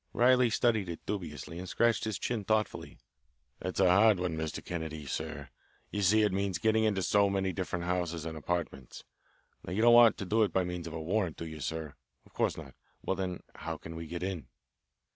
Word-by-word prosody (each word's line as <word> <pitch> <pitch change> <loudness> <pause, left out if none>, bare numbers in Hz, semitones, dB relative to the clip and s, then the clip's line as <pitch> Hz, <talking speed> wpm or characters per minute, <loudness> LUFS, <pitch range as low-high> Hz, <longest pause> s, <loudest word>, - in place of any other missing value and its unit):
Riley 125 0 +5
studied 110 -2 +1
it 85 - -7
dubiously 85 -4 -5
and 90 0 -6
scratched 115 +2 +2
his 110 -2 -2
chin 115 -4 -2
thoughtfully. 110 +1 -1 0.6
"That's 95 - -4
a 95 - +5
hard 100 +2 +5
one, 90 -3 -1
Mr. 80 -1 -4
Kennedy, 80 -3 -5
sir. 70 0 -5 0.4
You 105 - -2
see, 105 +3 +4
it 105 -3 +2
means 95 -2 0
getting 110 +4 +2
into 100 -3 +1
so 100 +1 +3
many 95 -1 0
different 90 -2 -3
houses 85 -2 -1
and 80 -1 -5
apartments. 80 -5 -4 0.6
Now 85 - -5
you 110 +4 +1
don't 120 0 +7
want 120 -1 +7
to 100 - -4
do 110 +5 +2
it 105 -4 +3
by 95 - +2
means 90 -1 -4
of 80 - -7
a 80 - -4
warrant, 90 +1 -1
do 85 - -5
you, 80 -1 -7
sir? 80 0 -4 0.3
Of - - -22
course - - 0
not. - - -9 0.3
Well, 95 - 0
then, 95 -2 -3
how 80 0 -5
can 80 +2 -9
we 80 0 -6
get 85 +2 -5
in?" 90 -7 -4
90 Hz, 210 wpm, -31 LUFS, 80-105 Hz, 0.6 s, don't